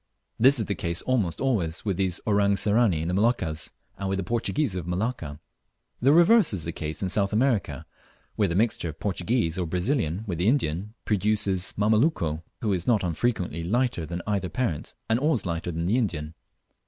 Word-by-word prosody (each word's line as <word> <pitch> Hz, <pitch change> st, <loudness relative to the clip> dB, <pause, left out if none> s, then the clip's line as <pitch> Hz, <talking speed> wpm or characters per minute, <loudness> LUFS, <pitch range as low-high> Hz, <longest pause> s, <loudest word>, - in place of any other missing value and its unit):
This 135 Hz, +4 st, +6 dB
is 110 Hz, -, +1 dB
the 100 Hz, -, -1 dB
case 85 Hz, -2 st, -3 dB
almost 110 Hz, -10 st, 0 dB
always 100 Hz, -12 st, -1 dB
with 100 Hz, -3 st, 0 dB
these 95 Hz, -2 st, 0 dB
"Orang 100 Hz, -1 st, +3 dB
Sirani" 105 Hz, -5 st, +2 dB
in -, -, -3 dB
the 90 Hz, -, -1 dB
Moluccas, 95 Hz, -7 st, 0 dB, 0.3 s
and 100 Hz, -1 st, -2 dB
with 95 Hz, -, 0 dB
the 95 Hz, -, -2 dB
Portuguese 120 Hz, -, -1 dB
of 90 Hz, -2 st, -4 dB
Malacca. 90 Hz, -, -3 dB, 0.6 s
The 135 Hz, +3 st, +5 dB
reverse 175 Hz, -, +5 dB
is 90 Hz, -5 st, -2 dB
the 85 Hz, -, -3 dB
case 80 Hz, +1 st, -4 dB
in 95 Hz, -, 0 dB
South 100 Hz, +1 st, +1 dB
America, 110 Hz, -, 0 dB, 0.5 s
where -, -, +2 dB
the 85 Hz, -, -2 dB
mixture 105 Hz, -4 st, +1 dB
of 75 Hz, -, -7 dB
the -, -, -42 dB
Portuguese 95 Hz, -2 st, 0 dB
or 90 Hz, -, -1 dB
Brazilian 90 Hz, -, -1 dB
with 90 Hz, -6 st, -4 dB
the 90 Hz, -, +1 dB
Indian 105 Hz, -, 0 dB
produces 100 Hz, -3 st, 0 dB
the -, -, -5 dB
"Mameluco," 105 Hz, -, +2 dB, 0.2 s
who 105 Hz, -3 st, +1 dB
is 90 Hz, -2 st, -2 dB
not 110 Hz, -5 st, +3 dB
unfrequently 90 Hz, -2 st, -1 dB
lighter 115 Hz, -3 st, 0 dB
than 85 Hz, +1 st, -5 dB
either 100 Hz, -3 st, -1 dB
parent, 105 Hz, -, -3 dB
and 115 Hz, +1 st, +2 dB
always 145 Hz, -6 st, +1 dB
lighter 85 Hz, -1 st, -3 dB
than 85 Hz, 0 st, -3 dB
the 110 Hz, +8 st, +2 dB
Indian. 80 Hz, -9 st, -2 dB
100 Hz, 195 wpm, -26 LUFS, 85-115 Hz, 0.6 s, This